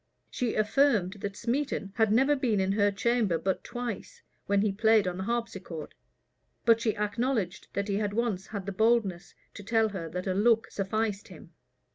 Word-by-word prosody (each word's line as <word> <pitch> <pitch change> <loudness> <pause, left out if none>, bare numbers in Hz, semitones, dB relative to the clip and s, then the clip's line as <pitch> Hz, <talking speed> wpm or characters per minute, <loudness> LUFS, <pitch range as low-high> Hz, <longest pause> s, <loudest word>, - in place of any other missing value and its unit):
[*] - - -46
She 245 -3 -1
affirmed 215 -4 +2
that 200 0 -4
Smeton 240 -4 -2
had 220 -2 +2
never 270 +6 +4
been 240 -7 +1
in 190 0 +1
her 205 0 +3
chamber 210 -3 +1
but 190 +3 -2
twice, 240 -4 -6 0.2
when 200 0 +3
he 210 - +2
played 220 0 +3
on 180 0 -2
the 190 - -3
harpsichord; 200 -9 -4 0.7
but 230 -1 +5
she 220 -2 0
acknowledged 210 -2 -1
that 200 0 -2
he 200 -1 0
had 205 -1 -1
once 215 -4 -1
had 200 -3 -6
the 200 - -3
boldness 205 -3 +1 0.2
to 205 - -9
tell 225 +1 +2
her 180 -5 -5
that 180 +3 -4
a 190 - 0
look 225 +3 +3
sufficed 210 +1 -2
him. 175 -2 -13
210 Hz, 185 wpm, -29 LUFS, 195-230 Hz, 0.7 s, but